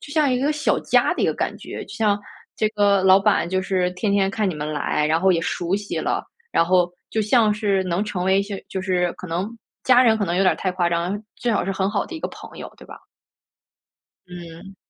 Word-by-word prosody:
就 285 Hz, -, -10 dB
像 300 Hz, -4 st, +2 dB
一 250 Hz, -, +1 dB
个 285 Hz, +4 st, +1 dB
小 300 Hz, 0 st, 0 dB
家 -, -, +2 dB
的 -, -, -2 dB
一 -, -, +3 dB
个 -, -, +1 dB
感 -, -, -2 dB
觉， -, -, -8 dB
就 205 Hz, -, -10 dB
像 215 Hz, -3 st, +2 dB, 0.4 s
这 215 Hz, -, +1 dB
个 205 Hz, -2 st, +2 dB
老 190 Hz, 0 st, +7 dB
板 195 Hz, -4 st, +2 dB
就 185 Hz, +1 st, 0 dB
是 185 Hz, -2 st, 0 dB
天 200 Hz, +3 st, -1 dB
天 195 Hz, -1 st, +2 dB
看 210 Hz, -1 st, -1 dB
你 175 Hz, -, -3 dB
们 150 Hz, 0 st, -4 dB
来， 150 Hz, 0 st, 0 dB
然 160 Hz, +1 st, +2 dB
后 190 Hz, 0 st, +4 dB
也 170 Hz, -, +1 dB
熟 175 Hz, +2 st, -2 dB
悉 205 Hz, 0 st, -3 dB
了， -, -, -1 dB, 0.3 s
然 -, -, +4 dB
后 180 Hz, 0 st, +2 dB, 0.2 s
就 220 Hz, -, 0 dB
像 215 Hz, 0 st, +3 dB
是 205 Hz, -3 st, 0 dB
能 180 Hz, +3 st, -1 dB
成 190 Hz, -4 st, -3 dB
为 190 Hz, +1 st, +3 dB
一 200 Hz, -, +2 dB
些 200 Hz, -1 st, -6 dB
就 190 Hz, -, -4 dB
是 180 Hz, -2 st, 0 dB
可 -, -, -10 dB
能 180 Hz, +4 st, -2 dB, 0.4 s
家 255 Hz, -1 st, +6 dB
人 225 Hz, -3 st, +4 dB
可 205 Hz, -, 0 dB
能 175 Hz, +1 st, -1 dB
有 195 Hz, -, +3 dB
点 185 Hz, -, +4 dB
太 185 Hz, -, -1 dB
夸 180 Hz, -1 st, 0 dB
张， 175 Hz, +4 st, -1 dB, 0.2 s
最 245 Hz, -, -2 dB
好 215 Hz, -, +1 dB
是 195 Hz, -, -2 dB
很 190 Hz, 0 st, 0 dB
好 205 Hz, -, -1 dB
的 340 Hz, -, -9 dB
一 320 Hz, -, -6 dB
个 -, -, -3 dB
朋 -, -, -12 dB
友， -, -, -8 dB
对 -, -, -15 dB
吧？ -, -, -11 dB, 1.3 s
嗯。 175 Hz, +2 st, -11 dB
195 Hz, 270 characters per minute, -22 LUFS, 180-210 Hz, 1.3 s, 老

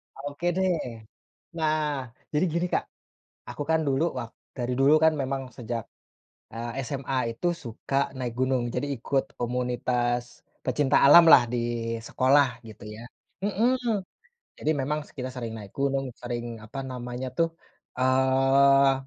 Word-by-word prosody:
Oke, 145 Hz, +4 st, -6 dB
deh. 190 Hz, 0 st, +2 dB, 0.9 s
Nah, 155 Hz, -5 st, 0 dB, 0.2 s
jadi 150 Hz, -, +3 dB
gini, 170 Hz, +3 st, 0 dB
Kak. -, -, +1 dB, 0.7 s
Aku -, -, -4 dB
kan 160 Hz, 0 st, +3 dB
dulu 140 Hz, +3 st, +2 dB
wak 115 Hz, -2 st, -5 dB, 0.3 s
dari 125 Hz, -1 st, -2 dB
dulu 140 Hz, +3 st, +6 dB
kan 160 Hz, -, +6 dB
memang 135 Hz, -2 st, -3 dB
sejak, 115 Hz, -2 st, -4 dB, 0.7 s
eee, 120 Hz, +3 st, -4 dB
SMA 130 Hz, -3 st, -2 dB
itu 145 Hz, +10 st, -1 dB
suka 135 Hz, -1 st, -2 dB
naik 125 Hz, -3 st, -3 dB
gunung. 130 Hz, -2 st, +1 dB
Jadi 145 Hz, -, -1 dB
ikut 135 Hz, +3 st, 0 dB, 0.2 s
komunitas 120 Hz, 0 st, -1 dB, 0.2 s
pecinta 135 Hz, +2 st, +2 dB
alamlah, 155 Hz, -4 st, +9 dB
di 120 Hz, -1 st, -2 dB
sekolah, 130 Hz, 0 st, +2 dB
gitu 110 Hz, -1 st, -12 dB
ya. 105 Hz, +2 st, -9 dB, 0.4 s
Mhm. 225 Hz, 0 st, +1 dB, 0.5 s
Jadi 155 Hz, -, -1 dB
memang 145 Hz, +3 st, -1 dB
s -, -, -19 dB
kita 130 Hz, -1 st, -4 dB
sering 120 Hz, -3 st, -5 dB
naik 100 Hz, -3 st, -10 dB
gunung, 135 Hz, -1 st, 0 dB
sering, 120 Hz, -2 st, -5 dB
apa 125 Hz, +5 st, -6 dB
namanya, 125 Hz, 0 st, -5 dB
tuh, 165 Hz, +5 st, +2 dB, 0.5 s
eee, 135 Hz, +1 st, +4 dB
130 Hz, 135 wpm, -27 LUFS, 120-145 Hz, 0.9 s, alamlah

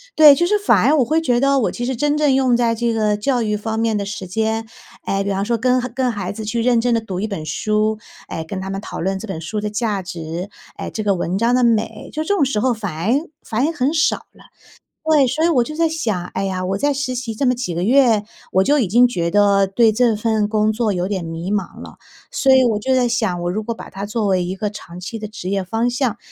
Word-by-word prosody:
对， 300 Hz, -3 st, +9 dB
就 345 Hz, -, +1 dB
是 420 Hz, +1 st, +2 dB
反 410 Hz, -, +3 dB
而 310 Hz, -, +4 dB
我 255 Hz, -, +3 dB
会 315 Hz, +7 st, +1 dB
觉 245 Hz, -6 st, +1 dB
得， 275 Hz, 0 st, +3 dB
我 225 Hz, -, 0 dB
其 240 Hz, -, -4 dB
实 260 Hz, 0 st, -2 dB
真 295 Hz, +4 st, 0 dB
正 295 Hz, -3 st, +3 dB
用 260 Hz, -2 st, +3 dB
在 230 Hz, -1 st, +1 dB
这 235 Hz, +1 st, 0 dB
个 215 Hz, -2 st, +1 dB
教 245 Hz, +3 st, 0 dB
育 210 Hz, -1 st, 0 dB
方 220 Hz, +1 st, -3 dB
面 225 Hz, -1 st, +1 dB
的 200 Hz, -, -2 dB
时 195 Hz, -2 st, -6 dB
间 220 Hz, +3 st, -1 dB, 0.4 s
诶， 195 Hz, 0 st, 0 dB
比 200 Hz, -, -3 dB
方 195 Hz, +1 st, -1 dB
说 235 Hz, +1 st, 0 dB
跟 255 Hz, +2 st, +2 dB, 0.2 s
跟 255 Hz, -2 st, +1 dB
孩 200 Hz, -4 st, -4 dB
子 220 Hz, +1 st, -6 dB
去 230 Hz, +2 st, -2 dB
认 240 Hz, -1 st, +3 dB
真 245 Hz, 0 st, +1 dB
地 230 Hz, -, +2 dB
读 195 Hz, -5 st, -5 dB
一 215 Hz, -, -1 dB
本 180 Hz, -7 st, -5 dB
书， 215 Hz, +7 st, 0 dB, 0.3 s
诶， 160 Hz, -, -4 dB
跟 190 Hz, +4 st, -6 dB
他 190 Hz, 0 st, -5 dB
们 195 Hz, +1 st, -4 dB
讨 -, -, -7 dB
论 190 Hz, +2 st, -1 dB
这 225 Hz, -, -7 dB
本 190 Hz, -5 st, -5 dB
书 210 Hz, +6 st, -4 dB
的 210 Hz, -, -2 dB
价 210 Hz, -2 st, -1 dB
值， 175 Hz, +1 st, -6 dB, 0.3 s
诶， -, -, -5 dB
这 215 Hz, -, -4 dB
个 200 Hz, -2 st, +2 dB
文 180 Hz, +2 st, -2 dB
章 235 Hz, +3 st, +2 dB
的 250 Hz, -, +2 dB
美。 225 Hz, -2 st, 0 dB
就 310 Hz, 0 st, -3 dB
这 405 Hz, -, +1 dB
种 315 Hz, -, +2 dB
时 260 Hz, -6 st, 0 dB
候 255 Hz, +1 st, +2 dB
反 200 Hz, -7 st, -5 dB
而 255 Hz, -, 0 dB
反 240 Hz, +5 st, -1 dB
而 320 Hz, -, 0 dB
很 290 Hz, -2 st, 0 dB
少 315 Hz, -1 st, +2 dB, 0.2 s
了。 -, -, -19 dB, 0.6 s
对， 305 Hz, -4 st, +4 dB
所 305 Hz, +6 st, 0 dB
以 -, -, +3 dB
我 255 Hz, -8 st, +3 dB
就 305 Hz, +5 st, -7 dB
在 330 Hz, 0 st, +2 dB
想： 215 Hz, -, -2 dB
“哎 195 Hz, -, -2 dB
呀， 185 Hz, -1 st, -2 dB
我 195 Hz, +1 st, -1 dB
在 285 Hz, +6 st, +1 dB
实 270 Hz, -2 st, -2 dB
习 235 Hz, -3 st, -4 dB
这 275 Hz, -, -1 dB
么 250 Hz, -, +4 dB
几 210 Hz, -9 st, -4 dB
个 175 Hz, -, -1 dB
月， 230 Hz, -2 st, +4 dB, 0.3 s
我 190 Hz, +1 st, +4 dB
就 290 Hz, +4 st, +3 dB
已 220 Hz, -, +1 dB
经 240 Hz, +6 st, +5 dB
觉 170 Hz, -7 st, -2 dB
得， 200 Hz, -1 st, +4 dB
对 220 Hz, +3 st, +3 dB
这 230 Hz, 0 st, +2 dB
份 215 Hz, -1 st, 0 dB
工 215 Hz, 0 st, +2 dB
作 220 Hz, -2 st, 0 dB
有 180 Hz, +1 st, -1 dB
点 190 Hz, -4 st, -2 dB
迷 165 Hz, +4 st, -5 dB
茫 205 Hz, -2 st, -3 dB
了。” -, -, -11 dB, 0.3 s
所 270 Hz, -1 st, +3 dB
以 260 Hz, -1 st, +6 dB
我 215 Hz, -3 st, +1 dB
就 260 Hz, +3 st, +1 dB
在 250 Hz, -1 st, +3 dB
想： 220 Hz, -6 st, 0 dB
“我 175 Hz, -, -1 dB
如 215 Hz, +3 st, -3 dB
果 230 Hz, +1 st, -4 dB
把 -, -, -10 dB
它 195 Hz, +1 st, -6 dB
作 210 Hz, +1 st, -2 dB
为 185 Hz, -2 st, +2 dB
一 185 Hz, -, -4 dB
个 210 Hz, +1 st, -2 dB
长 180 Hz, -4 st, -10 dB
期 215 Hz, +5 st, -6 dB
的 215 Hz, -, -5 dB
职 205 Hz, -3 st, -7 dB
业 195 Hz, 0 st, 0 dB
方 225 Hz, +6 st, -1 dB
向， 245 Hz, -3 st, -1 dB
220 Hz, 290 characters per minute, -19 LUFS, 195-250 Hz, 0.6 s, 对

